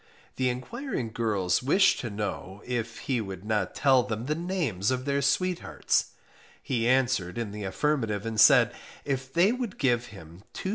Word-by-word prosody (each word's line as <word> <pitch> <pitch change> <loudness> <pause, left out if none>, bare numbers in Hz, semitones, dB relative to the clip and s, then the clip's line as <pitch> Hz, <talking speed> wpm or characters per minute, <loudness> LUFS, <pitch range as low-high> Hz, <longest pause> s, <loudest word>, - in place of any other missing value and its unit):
The 130 -1 +2
enquiring 130 - -4
girls 100 -6 0
wished 185 +9 +4
to 120 - -4
know 100 -1 -5
if 115 -2 -3
he 130 -5 -1
could 95 -2 -7
not 105 -3 -1
tell 135 -2 +4
the 120 +4 -3
names 160 - -1
of 130 0 -1
their 140 0 0
sweethearts; 180 +6 0 0.5
he 115 -3 -1
answered 125 -8 +1
in 115 -3 -3
the 105 -1 -6
affirmative, 115 -2 -1
and 110 -1 -2
said, - - +6 0.3
if 135 -2 -3
they 175 +7 +4
would 245 -5 -4
give 120 -2 +1
him 85 -3 -13
2s. 190 - -4
120 Hz, 160 wpm, -27 LUFS, 105-140 Hz, 0.5 s, said